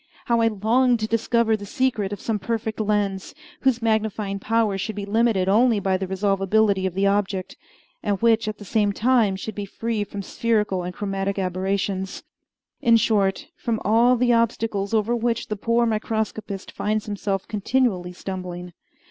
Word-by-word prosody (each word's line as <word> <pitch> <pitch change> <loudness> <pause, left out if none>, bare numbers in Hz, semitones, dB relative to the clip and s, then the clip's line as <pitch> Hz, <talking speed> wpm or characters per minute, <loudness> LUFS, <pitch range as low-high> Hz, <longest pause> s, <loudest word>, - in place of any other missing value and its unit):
How 235 -2 +2
I 225 - +4
longed 230 +4 +2
to 215 - 0
discover 230 0 +2
the 205 - -7
secret 215 -4 0
of 205 - -5
some 220 -2 -2
perfect 220 +2 -3
lens, 205 -3 -1 0.2
whose 250 -3 +1
magnifying 215 -3 0
power 220 -1 +1
should 195 +2 -3
be 205 -1 -4
limited 215 -2 +2
only 225 +2 +4
by 190 -1 +1
the 190 0 -2
resolvability 195 +1 +1
of 180 - -6
the 195 +1 +1
object, 195 -2 0 0.5
and 200 -2 -1
which 230 -1 +3
at 215 - -3
the 205 - -11
same 205 0 +1
time 230 -3 +2
should 215 +3 -6
be 205 0 -4
free 225 +1 -2
from 200 0 -7
spherical 210 -4 0
and 180 +1 -5
chromatic 195 -1 -2
aberrations 190 +1 -2 0.6
in 235 -4 +5
short, 215 +5 +1
from 230 -3 -2
all 230 +4 +5
the 245 0 +3
obstacles 225 -3 0
over 225 +1 +1
which 235 0 -1
the 215 - -1
poor 230 +3 +1
microscopist 220 -2 -3
finds 215 0 -1
himself 200 -2 -3
continually 210 -4 0
stumbling! 180 -1 -6
210 Hz, 165 wpm, -23 LUFS, 195-230 Hz, 0.6 s, in